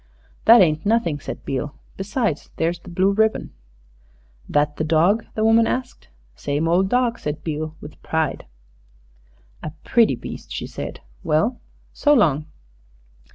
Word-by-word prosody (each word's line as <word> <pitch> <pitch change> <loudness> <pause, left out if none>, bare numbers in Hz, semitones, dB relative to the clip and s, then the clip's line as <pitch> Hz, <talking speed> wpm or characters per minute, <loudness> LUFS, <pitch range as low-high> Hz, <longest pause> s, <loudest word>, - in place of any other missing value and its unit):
"That 230 0 +9
ain't 155 -2 +1
nothing," 205 -9 +1
said - - -7
Beale; 135 +1 -3 0.2
"besides, 195 - -2
there's 165 +2 -1
the - - -13
blue 185 +3 +2
ribbon." 220 +2 +1 1.0
"That 150 0 +1
the - - -1
dog?" 170 +8 +2
the 215 - 0
woman 225 0 +5
asked. 255 0 -4 0.3
"Same 145 - -1
ole 175 +3 +4
dawg," 235 +4 +1
said 150 0 -4
Beale, 155 0 -4
with 150 - -11
pride. 160 - -2 1.1
"A 155 - -5
pretty 230 - +3
beast," - - -9
she - - -4
said. - - -7 0.2
"Well 210 +11 +1 0.3
so 295 0 +3
long." 155 - +2
170 Hz, 140 wpm, -22 LUFS, 150-225 Hz, 1.1 s, That